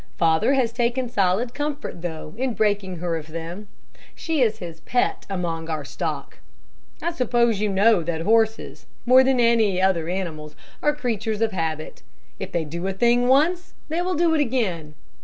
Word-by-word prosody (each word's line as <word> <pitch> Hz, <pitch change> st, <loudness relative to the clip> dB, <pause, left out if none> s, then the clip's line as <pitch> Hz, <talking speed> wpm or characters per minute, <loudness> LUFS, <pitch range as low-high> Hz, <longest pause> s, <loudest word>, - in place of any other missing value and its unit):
Father 165 Hz, +10 st, +3 dB
has 240 Hz, -4 st, +1 dB
taken 245 Hz, +1 st, 0 dB
solid 210 Hz, +2 st, +1 dB
comfort 290 Hz, -, -4 dB
though, 160 Hz, -2 st, -6 dB
in 250 Hz, 0 st, -2 dB
breaking 205 Hz, -3 st, 0 dB
her 170 Hz, 0 st, -2 dB
of 155 Hz, -1 st, -8 dB
them. 165 Hz, +5 st, -7 dB, 0.5 s
She 320 Hz, -4 st, -1 dB
is 220 Hz, -3 st, +2 dB
his 170 Hz, -5 st, -8 dB
pet 245 Hz, +9 st, -1 dB
among 165 Hz, -4 st, -3 dB
our 155 Hz, -3 st, -3 dB
stock. -, -, -5 dB, 0.6 s
I 340 Hz, -, 0 dB
suppose 240 Hz, -, +1 dB
you 210 Hz, -, +1 dB
know 200 Hz, 0 st, +4 dB
that 165 Hz, 0 st, -3 dB
horses, 220 Hz, +3 st, +1 dB, 0.2 s
more 255 Hz, +1 st, +7 dB
than 260 Hz, -1 st, +2 dB
any 225 Hz, -5 st, +3 dB
other 180 Hz, -4 st, +1 dB
animals, 160 Hz, -5 st, -4 dB, 0.3 s
are 295 Hz, 0 st, +2 dB
creatures 225 Hz, -6 st, -2 dB
of 225 Hz, -1 st, +2 dB
habit. 160 Hz, -4 st, -4 dB, 0.4 s
If -, -, -5 dB
they 170 Hz, -2 st, -1 dB
do 170 Hz, +5 st, -4 dB
a 195 Hz, -, -1 dB
thing 240 Hz, +4 st, +3 dB
once, 325 Hz, +7 st, +2 dB
they 325 Hz, +3 st, -1 dB
will 365 Hz, +1 st, -1 dB
do 330 Hz, +1 st, +3 dB
it 310 Hz, -, +3 dB
again. 190 Hz, -, -1 dB
210 Hz, 175 wpm, -23 LUFS, 170-250 Hz, 0.6 s, more